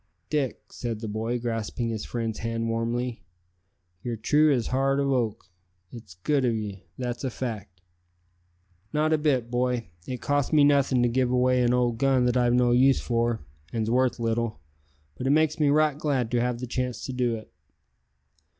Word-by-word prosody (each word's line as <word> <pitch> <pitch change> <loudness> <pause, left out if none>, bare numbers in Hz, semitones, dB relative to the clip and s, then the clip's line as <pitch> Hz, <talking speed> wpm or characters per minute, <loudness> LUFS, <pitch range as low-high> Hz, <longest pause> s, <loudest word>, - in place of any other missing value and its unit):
"Dick," 145 -4 -1
said 115 -3 -4
the 110 - -5
boy, 110 +3 -2
grasping 115 0 -3
his 110 -2 -4
friend's 115 -2 -3
hand 115 0 -2
warmly, 115 +1 -2 0.8
"ye're 120 +2 -3
true 150 +7 +3
as 125 -5 +1
heart 135 +1 +1
of 140 -1 +1
oak. 120 -5 -1 0.5
It's 110 -7 -11
good 145 -3 +2
of 120 -2 +2
'ee; 100 -3 -5
that's 125 0 -4
a 130 - 0
fact." 110 -8 -6 1.1
"Not 155 +1 +2
a 155 - +2
bit, 130 -6 +1
boy; 125 -4 0 0.2
it 125 -1 -4
costs 145 -1 0
me 150 -2 +5
nothin' 140 -3 +4
to - - +4
give 125 +1 +1
away 125 0 +3
an 120 -1 +3
old 120 -2 +1
gun 135 -2 +3
that 125 0 +1
I've 120 -1 +3
no 125 -1 +3
use 130 +2 +5
for, 115 -1 0 0.3
an's 110 -1 -1
worth 125 0 +2
little, 115 -4 -1 0.6
but 130 - -2
it - - +2
makes 155 +2 +3
me 150 -2 +3
right 150 0 +3
glad 135 -7 0
to 120 -1 +2
have 125 0 0
the - - -2
chance 125 0 -3
to 130 - -5
do 125 -2 0
it." 110 -11 -11
125 Hz, 185 wpm, -26 LUFS, 115-135 Hz, 1.1 s, me